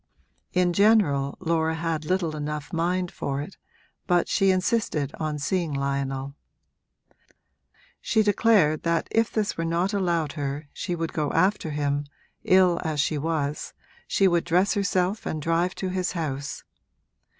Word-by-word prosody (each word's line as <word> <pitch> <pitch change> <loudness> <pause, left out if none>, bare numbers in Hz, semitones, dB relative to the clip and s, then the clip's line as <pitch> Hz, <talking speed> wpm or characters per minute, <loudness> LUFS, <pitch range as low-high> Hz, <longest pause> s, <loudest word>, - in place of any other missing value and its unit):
In 180 -1 +2
general 170 -9 +3
Laura 160 -2 0
had 160 -1 -2
little 175 -3 0
enough 150 +2 -5
mind 175 +2 0
for 140 0 -3
it, 150 +7 -7 0.5
but 175 -2 +3
she 195 - +2
insisted 185 - 0
on 155 -1 -2
seeing 165 +3 -1
Lionel: 140 0 -2 1.7
she 220 -1 +2
declared 205 -7 +3
that 170 0 0
if 225 0 +2
this 210 -2 -1
were 165 - -1
not 170 +4 0
allowed 170 -6 0
her 145 0 -4
she 175 - -3
would 165 -1 -3
go 150 -2 -1
after 190 -3 +2
him, 145 -1 -1 0.4
ill 185 -2 +4
as 155 -3 -2
she 150 +1 +1
was 150 -1 -2 0.3
she 195 - +3
would 175 -2 +2
dress 180 +4 +2
herself 200 -1 0
and 155 - -2
drive 165 +4 0
to 190 - -3
his 185 -1 -1
house. 145 -5 -4
165 Hz, 145 wpm, -25 LUFS, 150-185 Hz, 1.7 s, ill